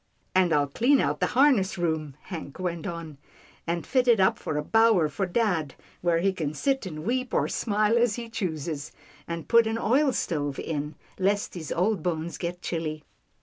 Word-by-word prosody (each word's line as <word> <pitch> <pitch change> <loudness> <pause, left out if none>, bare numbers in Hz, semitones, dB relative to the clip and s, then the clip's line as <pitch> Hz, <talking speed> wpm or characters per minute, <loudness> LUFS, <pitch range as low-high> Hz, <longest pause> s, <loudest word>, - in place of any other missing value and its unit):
" - - -42
And 185 -2 +4
I'll 145 -2 +3
clean 245 - +3
out - - 0
the - - +2
harness 235 -9 +4
room," 160 -5 -1
Hank 165 -7 -7
went 175 -1 -3
on, 165 -5 -7 0.2
" - - -28
and 170 0 -2
fit 255 -2 +1
it 235 -3 +5
up 190 - +3
for 150 - -3
a 150 - -1
bower 225 -5 +4
for 195 +3 -2
dad, 175 - 0 0.3
where 175 -1 +2
he 195 +1 +2
can 155 -5 -3
sit 270 - 0
and 155 -2 -7
weep 255 +2 -1
or - - +2
smile 215 +1 +1
as 235 -3 +2
he 235 -1 -6
chooses, 160 -8 -4 0.4
and 170 -1 -5
put 230 -1 +5
an 225 +1 -1
oil 265 +6 +3
stove 145 - -2
in, 150 -1 -4 0.2
lest 200 +2 +1
his 165 -4 -6
old 195 +1 +1
bones 170 0 -3
get 175 0 -4
chilly." 155 -3 -3
180 Hz, 195 wpm, -27 LUFS, 160-225 Hz, 0.4 s, it